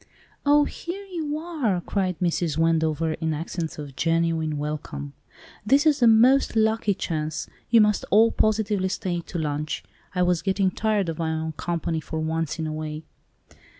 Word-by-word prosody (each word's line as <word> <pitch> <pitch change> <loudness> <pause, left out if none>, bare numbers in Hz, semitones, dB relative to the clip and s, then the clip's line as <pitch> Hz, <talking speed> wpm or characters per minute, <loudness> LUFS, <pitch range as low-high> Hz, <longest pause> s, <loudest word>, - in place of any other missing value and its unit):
"Oh, 290 0 +6
here 360 +7 -6
you 325 -6 -4
are!" 305 - -1
cried 185 -1 -2
Mrs. 170 -3 0
Wendover, 160 -1 +1
in 160 -1 -2
accents 165 +1 -4
of 145 -3 -8
genuine 165 -1 0
welcome. 145 - -5 0.5
"This 275 +8 +3
is 300 -2 +4
the 240 - +5
most 240 +4 +5
lucky 220 -2 +2
chance. 155 -4 -3 0.2
You 230 -1 +6
must 210 -1 +2
all 225 +3 +5
positively 210 -3 +1
stay 180 -2 -2
to 175 - -7
lunch. 150 -1 -2 0.3
I 180 - +3
was 180 -2 +2
getting 190 -1 +1
tired 210 -2 0
of 165 -1 -4
my 160 -1 0
own 160 0 -2
company 165 0 -2
for 160 +1 -5
once 160 0 -2
in 160 - -3
a 155 - -3
way. 155 0 -5
175 Hz, 165 wpm, -25 LUFS, 160-220 Hz, 0.5 s, Oh